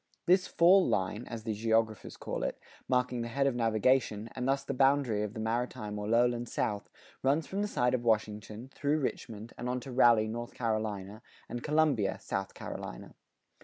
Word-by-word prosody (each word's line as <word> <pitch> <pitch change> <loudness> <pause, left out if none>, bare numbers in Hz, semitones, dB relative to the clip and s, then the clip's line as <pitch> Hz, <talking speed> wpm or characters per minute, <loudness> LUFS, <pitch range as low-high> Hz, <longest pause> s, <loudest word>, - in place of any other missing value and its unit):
This 185 +1 +4
"fall 185 +3 +5
line," 105 +5 -1
as 115 -2 -6
the 110 -1 -2
geographers 110 0 0
call - - -4
it, - - -2 0.3
marking 125 -1 +1
the 115 - -3
head 135 +4 0
of 135 - +2
navigation, 115 -1 +1
and 125 - -3
thus 135 0 +1
the 140 - -3
boundary 135 -5 +3
of 105 +1 -4
the - - -5
maritime 110 -2 -2
or 105 - -4
lowland 120 +1 +2
South, 105 -2 -2 0.3
runs 145 +4 +2
from 195 +1 -3
the 210 - 0
site 125 -10 +1
of 125 -2 0
Washington, 110 +2 -1
through 145 +1 +1
Richmond, 115 -5 -4
and 125 - -3
on 125 0 -1
to 135 - -8
Raleigh, 120 -3 +5
North 120 +2 -5
Carolina, 110 -3 -2 0.3
and 120 +1 -5
Columbia, 150 -10 +2
South 95 0 -4
Carolina. - - -7
120 Hz, 180 wpm, -31 LUFS, 110-130 Hz, 0.3 s, fall